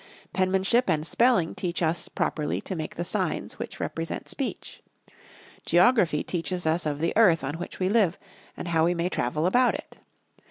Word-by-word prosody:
Penmanship 190 Hz, +5 st, +2 dB
and 155 Hz, -2 st, +1 dB
Spelling 230 Hz, -4 st, +2 dB
teach 175 Hz, -1 st, -3 dB
us 165 Hz, +1 st, 0 dB
properly 150 Hz, -2 st, -1 dB
to 190 Hz, -, -5 dB
make 155 Hz, -2 st, -5 dB
the 170 Hz, -, -2 dB
signs 185 Hz, -1 st, -2 dB
which -, -, -6 dB
represent 165 Hz, 0 st, -4 dB
speech. 275 Hz, -, -5 dB, 0.8 s
Geography 180 Hz, -4 st, +3 dB
teaches 180 Hz, 0 st, -3 dB
us 160 Hz, +1 st, +1 dB
of 145 Hz, -1 st, -1 dB
the 165 Hz, -, +1 dB
earth 185 Hz, -9 st, +5 dB
on 145 Hz, +4 st, -4 dB
which 175 Hz, -, -7 dB
we 185 Hz, -, +1 dB
live, 200 Hz, -4 st, +2 dB, 0.4 s
and 175 Hz, -, -5 dB
how 165 Hz, -1 st, +3 dB
we 175 Hz, +1 st, +1 dB
may 170 Hz, +1 st, -1 dB
travel 150 Hz, +1 st, -1 dB
about 245 Hz, +7 st, +3 dB
it. -, -, -9 dB
175 Hz, 170 wpm, -26 LUFS, 160-190 Hz, 0.8 s, earth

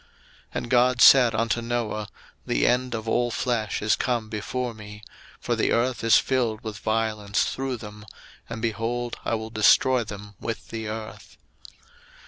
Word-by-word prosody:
01:006:013 -, -, -31 dB, 0.5 s
And 120 Hz, -, -3 dB
God 125 Hz, 0 st, +4 dB
said 125 Hz, -4 st, +7 dB
unto 115 Hz, +1 st, 0 dB
Noah, 115 Hz, -3 st, -2 dB, 0.4 s
The -, -, +1 dB
end 125 Hz, -1 st, +1 dB
of 110 Hz, 0 st, -6 dB
all 120 Hz, +2 st, +1 dB
flesh 115 Hz, -3 st, -2 dB
is 110 Hz, -, +3 dB
come 120 Hz, -4 st, -2 dB
before 115 Hz, +3 st, -3 dB
me; 105 Hz, -1 st, -11 dB, 0.4 s
for -, -, -1 dB
the -, -, +1 dB
earth 120 Hz, +1 st, 0 dB
is 115 Hz, -, +6 dB
filled 120 Hz, -5 st, 0 dB
with 110 Hz, -2 st, -6 dB
violence 110 Hz, -2 st, 0 dB
through 135 Hz, -1 st, -3 dB
them; 105 Hz, -1 st, -11 dB, 0.4 s
and, 115 Hz, 0 st, -6 dB
behold, 115 Hz, +2 st, -2 dB
I -, -, 0 dB
will 110 Hz, 0 st, -6 dB
destroy 120 Hz, +3 st, +4 dB
them 105 Hz, -1 st, -9 dB
with 115 Hz, -, -5 dB
the 110 Hz, -1 st, -5 dB
earth. 110 Hz, 0 st, -8 dB
115 Hz, 160 wpm, -25 LUFS, 110-120 Hz, 0.5 s, said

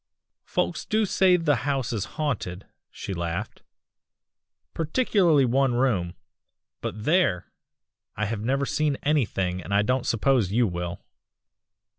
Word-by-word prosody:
"'Folks -, -, -1 dB
do 215 Hz, -1 st, +1 dB
say 185 Hz, -2 st, +4 dB
the 150 Hz, -6 st, +2 dB
house 135 Hz, -2 st, -1 dB
is 105 Hz, -3 st, -2 dB
haunted,' 110 Hz, -, -3 dB, 0.2 s
she 100 Hz, -, -6 dB
laughed, 85 Hz, -1 st, -4 dB, 1.1 s
'particularly 165 Hz, -, +2 dB
one 130 Hz, +1 st, +2 dB
room 100 Hz, -9 st, 0 dB, 0.7 s
but 105 Hz, -, -5 dB
there! 155 Hz, -, +1 dB, 0.6 s
I 110 Hz, -, -1 dB
have 105 Hz, 0 st, -3 dB
never 135 Hz, +5 st, 0 dB
seen 150 Hz, -1 st, 0 dB
anything, 95 Hz, -11 st, 0 dB
and 95 Hz, -, -9 dB
I 105 Hz, -, +4 dB
don't 125 Hz, +3 st, 0 dB
suppose 115 Hz, -3 st, +2 dB
you 120 Hz, +3 st, +3 dB
will. 90 Hz, -2 st, -4 dB
125 Hz, 125 wpm, -25 LUFS, 100-150 Hz, 1.1 s, say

